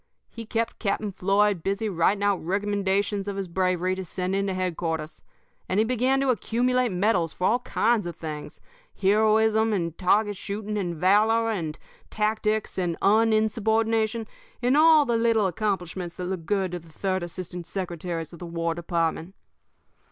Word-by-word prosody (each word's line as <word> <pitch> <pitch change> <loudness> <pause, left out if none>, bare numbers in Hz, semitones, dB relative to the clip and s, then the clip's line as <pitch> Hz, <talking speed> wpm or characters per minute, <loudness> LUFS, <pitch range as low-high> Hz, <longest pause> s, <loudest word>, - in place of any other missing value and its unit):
He 230 -1 -8
kept 230 +1 -2
Captain 205 0 -1
Floyd 195 0 +2
busy 200 +5 -1
writing 195 +2 +1
out 205 -2 +1
recommendations 200 +1 0
of 200 - -3
his 195 -1 -3
bravery 185 +1 0
to 190 0 -4
send 185 +1 -3
in 195 0 0
to 190 - -1
headquarters; 165 -3 -3 0.5
and 185 - +1
he - - +5
began 255 +3 +1
to 275 - +1
accumulate 250 +3 +1
medals 180 -3 +1
for 180 - -2
all 240 +5 +3
kinds 230 -4 +1
of 170 - -6
things 155 -2 -7 0.4
heroism 220 +2 +3
and 170 -5 -2
target 205 +3 +2
shooting 210 +2 -4
and 180 -4 -2
valor 215 +6 +3
and 165 -7 -3 0.3
tactics 215 -1 -1
and 175 -2 -1
uninsubordination, 220 +1 +2 0.3
and 245 +2 +2
all 310 -1 +6
the 235 -3 +1
little 225 -2 +2
accomplishments 180 -2 -2
that 180 - -5
look 180 -3 -4
good 195 -3 0
to 175 - -4
the 165 0 -18
third 185 +3 -2
assistant 175 0 -6
secretaries 175 -3 -4
of 170 - -11
the 175 - -7
War 165 0 -2
Department. 170 +1 -2
200 Hz, 160 wpm, -25 LUFS, 180-220 Hz, 0.5 s, all